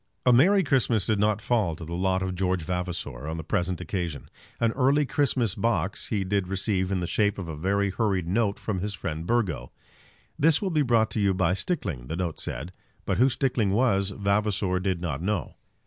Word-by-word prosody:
A 125 - +6
merry 190 +11 +5
Christmas 125 - +2
did 110 -2 +1
not 105 0 +1
fall 110 -10 +1
to 85 - -8
the 85 - -6
lot 95 +1 0
of 95 -1 -2
George 90 -1 0
Vavasor 85 -6 -3
on 80 +1 -3
the 80 - -5
present 90 0 -1
occasion. 85 -4 -4 0.3
An 115 -1 +2
early 140 +4 +3
Christmas 130 -7 +1
box 100 -4 -1
he 105 -3 -1
did 95 -1 0
receive 95 0 -1
in 95 -2 0
the - - -1
shape 105 +3 +1
of 95 -4 -5
a 80 - -5
very 100 +5 0
hurried 95 -4 0
note 100 +2 +1
from 100 -4 -3
his 100 +2 -3
friend 80 -2 -5
Burgo. 95 - 0 0.7
"This 160 0 +4
will 195 -3 -2
be 155 -2 +2
brought 115 -5 +2
to 110 - -1
you 100 -2 +2
by 90 -2 +2
Stickling," 95 - -2
the 80 - -3
note 85 -3 -3
said; 85 +5 -5 0.3
but - - 0
who 130 +2 +5
Stickling 120 -6 0
was 100 -4 +2
Vavasor 100 -2 0
did 90 -2 -1
not 80 -5 -3
know. 95 -3 -2
95 Hz, 205 wpm, -26 LUFS, 90-115 Hz, 0.7 s, A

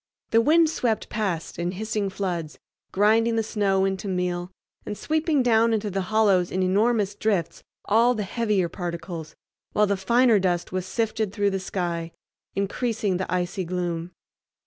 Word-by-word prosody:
The 230 - +5
wind 320 +5 +5
swept 240 -8 -1
past 190 -8 -3
in 175 +1 -1
hissing 210 0 -2
floods, 175 -5 -4 0.3
grinding 225 +3 +3
the 225 - +1
snow 195 -3 +1
into 195 +1 -2
meal 180 -1 -2 0.3
and 210 - -5
sweeping 310 -3 +1
down 230 -1 +4
into 210 -1 -1
the 195 +1 -1
hollows 200 -5 +3
in 185 0 0
enormous 205 +2 +2
drifts 200 -6 -1 0.2
all 235 +4 +4
the 215 - -2
heavier 205 -3 0
particles, 170 -2 -6 0.4
while 210 - +4
the 200 0 +1
finer 230 +3 +4
dust 180 -2 -1
was 185 0 -3
sifted 220 -2 -1
through 205 -1 +1
the 195 - -1
sky, 170 -3 -3 0.4
increasing 205 -1 -1
the 185 -2 -4
icy 180 +1 -1
gloom. 175 -1 -3
200 Hz, 155 wpm, -25 LUFS, 180-220 Hz, 0.4 s, The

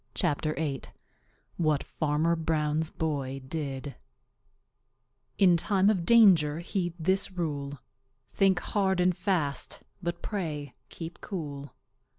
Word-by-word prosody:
CHAPTER 155 +1 0
VIII 145 -4 -2 0.8
What 155 -4 +1
Farmer 155 +2 0
Brown's 155 -1 0
Boy 140 -4 -2
Did 140 -2 -4 1.4
In 185 -3 +6
time 195 +3 +3
of 180 -5 -2
danger 185 -11 +6
heed 175 0 -2
this 190 +4 +1
rule: 145 -5 -3 0.5
Think 195 -2 +2
hard 190 -3 +1
and 180 0 +3
fast, 170 -8 -2 0.2
but 170 -1 -4
pray 155 - -3 0.2
keep 165 0 -8
cool. 145 -7 -6
160 Hz, 110 wpm, -29 LUFS, 145-185 Hz, 1.4 s, In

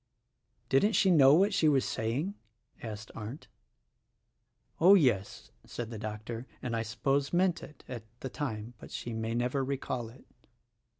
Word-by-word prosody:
"Didn't 205 +12 +3
she 190 -3 +4
know 140 -4 +7
what 200 +5 +3
she 160 -6 +4
was 135 -3 +3
saying?" 130 - -2 0.5
asked' 110 -1 -7
Arndt. 115 +7 -7 1.3
"Oh, 185 +5 +8
yes," 120 - +1
said 120 -1 -6
the 110 - -6
doctor, 110 +3 -6
"and 120 -2 -3
I 115 - 0
suppose 135 +6 0
meant 180 0 +2
it, 150 -4 -12
at 120 -3 -6 0.2
the - - -3
time; 120 -5 -4
but - - -11
she 120 - -5
may 110 +1 -2
never 125 +3 0
recall 130 -3 -3
it." 120 - -16
125 Hz, 155 wpm, -31 LUFS, 115-150 Hz, 1.3 s, Oh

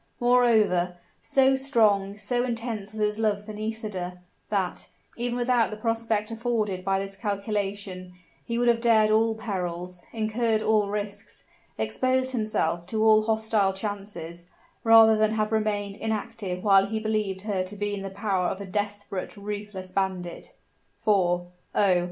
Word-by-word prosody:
Moreover, 220 -8 +3 0.2
so 270 0 +3
strong, 215 -7 +2
so 245 +3 -1
intense 230 -4 -3
was 215 -1 -2
his 210 +1 -2
love 210 -2 0
for 215 - -7
Nisida, 210 -4 -4 0.3
that, 195 -4 -2 0.3
even 240 0 -2
without 245 -1 +2
the 215 - -6
prospect 225 -1 -1
afforded 220 -5 -1
by 195 0 +1
this 195 0 -4
calculation, 200 -2 -3 0.3
he 235 -1 -3
would 240 0 +2
have 235 -1 +3
dared 220 -2 +4
all 220 +1 +3
perils, 180 -4 -4
incurred 220 0 0
all 215 -2 +2
risks, 205 0 -5 0.3
exposed 255 - 0
himself 215 -7 -1
to 220 +2 0
all 215 -1 +6
hostile 220 -2 +1
chances, 190 -4 -6 0.4
rather 225 -1 +8
than 215 0 +2
have 215 0 0
remained 205 -2 -1
inactive 215 -4 -3
while 195 -1 +5
he 220 +1 -2
believed 215 -3 -1
her 200 -2 -1
to 185 +3 -6
be 205 0 -2
in 200 - -4
the 195 - -5
power 195 -2 -1
of 190 - -3
a 200 - -6
desperate, 205 0 -4
ruthless 205 -2 -6
bandit. 190 - -3 0.4
For, 180 -5 +2 0.3
oh! 190 -3 +4
210 Hz, 150 wpm, -26 LUFS, 195-225 Hz, 0.4 s, rather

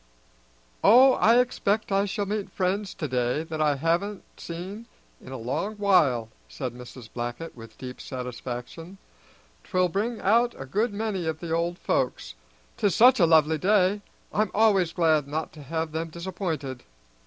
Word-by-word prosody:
"Oh, 260 +4 +7
I 230 0 +4
expect 220 -4 +1
I 195 +1 +2
shall 205 +1 -2
meet 205 0 -3
friends 190 +1 -2
today 125 -1 -1
that 160 -1 -5
I 150 -2 +3
haven't 170 +8 -1 0.2
seen 190 +7 -7 0.4
in 130 - -10
a 130 - -5
long 130 - -3
while," 150 - +3 0.2
said 85 - -5
Mrs. 125 -1 -11
Blackett 120 +7 -5
with 115 -2 -13
deep 125 -1 -8
satisfaction. 125 +7 -7 0.7
"'Twill 185 -2 +1
bring 215 +6 -2
out 235 +4 +2
a 135 - -6
good 210 - 0
many 200 -4 -3
of 160 -1 -2
the 170 -1 -6
old 170 +1 0
folks, 130 - -1 0.4
'tis 205 - +1
such 250 +1 +6
a 170 - +5
lovely 160 -1 +4
day. 200 +1 +3 0.3
I'm 215 0 +1
always 200 -6 +3
glad 160 -5 +2
not 155 +2 -4
to 155 - -12
have 160 +3 -3
them 165 +1 -3
disappointed." 165 -7 -4
170 Hz, 155 wpm, -26 LUFS, 140-205 Hz, 0.7 s, Oh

